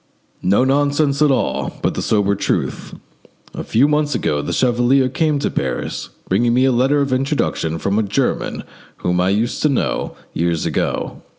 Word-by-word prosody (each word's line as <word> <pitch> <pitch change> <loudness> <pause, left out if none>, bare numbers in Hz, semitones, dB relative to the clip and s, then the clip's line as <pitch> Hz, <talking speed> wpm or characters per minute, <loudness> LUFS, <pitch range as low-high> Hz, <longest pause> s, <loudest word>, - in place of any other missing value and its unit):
"No 100 +7 +3
nonsense 140 +1 +1
at 150 - +5
all, 135 - -1
but - - +1
the - - -3
sober 100 -2 +1
truth. 100 - -2 0.6
A - - -5
few 125 +6 +3
months 150 0 +1
ago 75 -1 0
the 75 - -4
chevalier 125 +2 +2
came 150 +3 0
to 140 - -1
Paris, - - -3 0.2
bringing 120 +5 +2
me 130 +1 +4
a 135 - +3
letter 135 +4 +2
of 140 -2 0
introduction 130 - -1
from 100 +5 0
a - - +3
German 105 -1 -1 0.4
whom 90 0 +2
I 90 - +2
used 110 +4 0
to 150 - +3
know 135 - -1 0.2
years 85 -1 -1
ago. - - -2
125 Hz, 175 wpm, -19 LUFS, 100-140 Hz, 0.6 s, at